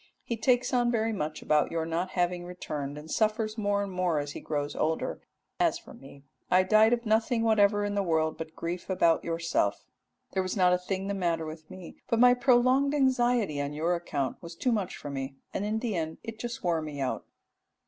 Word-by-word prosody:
He 235 - -3
takes 245 +3 +2
on 245 -1 +3
very 225 -1 +1
much 155 -6 -4
about 150 -1 +2
your 165 -1 -1
not 170 +3 -2
having 175 0 +1
returned, 150 -5 -5
and 155 +1 -9
suffers 215 0 +1
more 205 -2 0
and 200 - -5
more 180 -3 0
as 145 0 -2
he - - -7
grows 145 -2 -3
older: 160 +1 -1 0.4
as - - +3
for - - -14
me 135 +1 -14 0.3
I 185 +1 +5
died 215 +3 +5
of 240 0 0
nothing 225 +2 +2
whatever 205 -2 +3
in 205 - -2
the 200 - +1
world 160 -3 +1
but 160 0 -8
grief 175 +3 -5
about 170 -3 +3
yourself. 165 -11 -1 0.5
There 190 - 0
was 185 +2 -3
not 180 -1 +5
a 180 - +2
thing 190 +1 -3
the 200 - -2
matter 170 -4 0
with 155 0 -9
me, 185 -2 -10
but 230 - +2
my 245 0 +7
prolonged 255 +3 +3
anxiety 245 - +2
on 145 +1 -3
your 165 +4 0
account 145 -7 -3
was 170 -1 -9
too 250 +8 0
much 210 -5 -1
for 145 - -7
me, 135 0 -4 0.2
and 200 - -2
in 215 +1 0
the 220 -3 -2
end 160 -1 -3
it 225 -1 -7
just 240 0 -5
wore 170 -3 +1
me 150 -2 -6
out.'" 135 -2 -2
185 Hz, 215 wpm, -29 LUFS, 160-220 Hz, 0.5 s, my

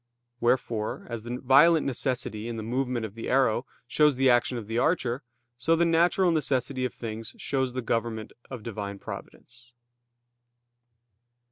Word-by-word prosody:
Wherefore, 120 -3 0
as 115 -1 -4
the 120 +2 -5
violent 145 +5 +5
necessity 125 -4 -2
in 115 -1 -4
the 110 - -4
movement 125 0 -1
of 105 - -8
the 115 - -6
arrow 130 -1 +2 0.2
shows 150 +3 +3
the 130 0 +4
action 120 0 +2
of 115 - -6
the 115 +3 -1
archer, 130 -5 +1 0.4
so 165 +7 +3
the 170 +1 +3
natural 175 +2 +3
necessity 130 -4 0
of 125 - -3
things 115 -1 -6
shows 130 -2 -1
the 130 -1 -3
government 115 -1 -2 0.2
of 125 -5 -7
Divine 100 -3 -5
Providence. 120 +4 -10
125 Hz, 150 wpm, -27 LUFS, 115-135 Hz, 0.4 s, violent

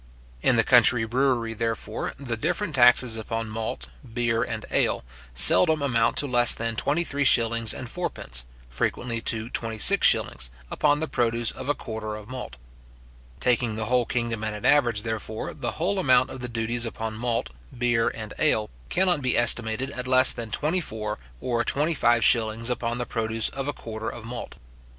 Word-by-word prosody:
In - - +3
the - - +4
country 115 -2 +4
brewery, 120 -1 0
therefore, 115 0 -4
the 125 -4 -4
different 170 - -2
taxes 125 -2 +5
upon 115 0 -4
malt, 110 - -4 0.3
beer, 115 -2 0
and - - -4
ale, - - +1 0.3
seldom 155 - +6
amount 115 -5 +1
to - - +3
less 120 -3 +4
than 115 0 -3
twenty 150 +8 0
three 145 -3 -2
shillings 115 -3 +3
and - - -5
fourpence, 60 0 -4 0.2
frequently 115 - -3
to 110 +2 -2
twenty 115 -1 -3
six - - +6
shillings, - - 0 0.2
upon 145 0 +1
the 160 - -1
produce 120 -3 0
of 130 +1 -7
a 145 - +2
quarter 110 -2 -6
of 105 -1 -10
malt. 125 - -7 0.8
Taking 120 - +1
the 110 0 -3
whole 125 0 +1
kingdom 115 -2 -2
at 110 -1 -3
an 105 - -7
average, 120 -8 +3
therefore, 110 -1 -5
the 120 - -4
whole 190 +5 -1
amount 130 -6 +3
of 130 - -8
the 125 -1 -4
duties 115 +1 -2
upon 110 -1 -5
malt, 115 - -3 0.3
beer, 120 -2 +1
and 110 -2 -5
ale, 110 - +1 0.2
cannot 180 -4 +1
be 125 -1 +1
estimated 120 +2 +2
at 125 -2 -6
less 130 0 +6
than 115 -2 -7
twenty 155 +10 -1
four 105 -6 -5 0.2
or 120 -2 -1
twenty 150 +7 0
five 120 -5 +2
shillings 115 +1 +2
upon 120 -1 -2
the 120 - -3
produce 115 -1 0
of 135 0 -5
a - - 0
quarter 110 -3 -6
of 115 - -9
malt. 120 +1 -7
120 Hz, 180 wpm, -25 LUFS, 110-130 Hz, 0.8 s, seldom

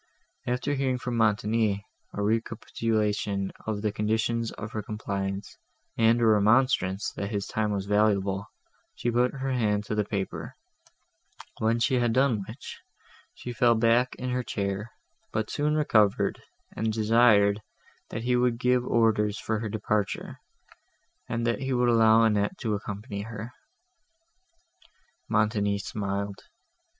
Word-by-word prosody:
After 125 +4 -1
hearing 135 -2 0
from 125 -1 -4
Montoni 105 -1 +1 0.3
a 105 - -2
recapitulation 105 -2 -1 0.2
of 105 -1 -2
the 105 - +1
conditions 110 +2 0
of 110 - -7
her 110 - -3
compliance, 100 -2 -4 0.4
and 115 +1 +4
a 120 - +3
remonstrance, 105 -2 +3
that 100 - -4
his 100 -2 -2
time 105 0 -1
was 100 -2 -2
valuable, 100 -1 +1 0.5
she 120 - -1
put 125 +2 +2
her 135 0 -3
hand 105 -5 +1
to 105 - -4
the 105 0 +1
paper; 100 -2 -4 1.0
when 110 +1 +2
she 130 +1 +2
had 120 -2 +1
done 125 -5 +2
which, 115 +5 -9 0.6
she 120 - -7
fell 120 0 +4
back 115 +2 +3
in 125 0 -4
her 125 0 0
chair, 100 -1 -3 0.4
but 110 -1 -2
soon 150 +1 0
recovered, 110 -9 +2 0.3
and 110 0 0
desired, 110 -2 +4 0.5
that 115 - -5
he 125 +1 +2
would 125 -1 +2
give 125 0 +2
orders 110 -4 +2
for 110 -1 -2
her 110 -1 -3
departure, 105 -1 -2 0.9
and 115 0 -1
that 115 0 0
he 135 0 -2
would 125 -1 +2
allow 115 -1 +5
Annette 105 - +1
to 110 -5 -1
accompany 100 +1 -5
her. 110 +2 -7 1.8
Montoni 105 -2 +1
smiled. 100 -1 -3
110 Hz, 140 wpm, -27 LUFS, 105-120 Hz, 1.8 s, allow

